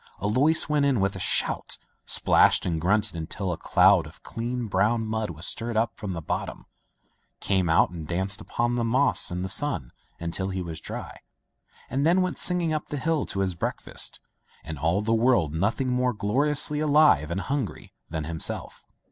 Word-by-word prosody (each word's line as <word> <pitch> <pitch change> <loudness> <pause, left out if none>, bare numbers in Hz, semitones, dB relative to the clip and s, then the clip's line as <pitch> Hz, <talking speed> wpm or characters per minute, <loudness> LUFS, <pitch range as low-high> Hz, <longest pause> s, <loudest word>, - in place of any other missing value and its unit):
Alois 130 +10 +2
went 150 -2 +1
in 140 -5 +2
with 95 0 0
a - - -6
shout, - - +1 0.3
splashed - - +3
and 80 -3 -1
grunted 100 +2 +1
until 90 +4 -4
a - - -2
cloud - - +4
of - - -16
clean 120 +1 -4
brown 110 +2 +1
mud 110 -1 -2
was 80 -1 -6
stirred 115 -1 -2
up 115 +1 0
from 100 -5 -5
the 85 -2 -6
bottom, - - -4 0.7
came 95 -4 0
out 80 - +4
and 80 -3 -7
danced 95 +4 -2
upon 120 +1 -1
the 120 -1 0
moss 130 +5 +3
in 90 +1 -3
the - - -2
sun 95 - 0 0.3
until 85 +3 -3
he 95 0 -3
was 80 -2 -6
dry, - - -7 0.7
and 135 +3 -1
then 175 +4 +3
went 185 - -3
singing 175 -3 +1
up 155 - -3
the 145 - -4
hill 155 +2 -1
to 95 - -2
his 95 -2 0
breakfast, 85 - -1 0.5
in 80 -2 -6
all 85 +7 +1
the 115 +1 +1
world 115 - +2
nothing 110 +10 0
more 125 0 +1
gloriously 145 +8 +1
alive 150 - +4
and 90 +3 -2
hungry 130 - -4 0.2
than 80 -1 -3
himself. 80 +1 -3
110 Hz, 180 wpm, -26 LUFS, 90-135 Hz, 0.7 s, cloud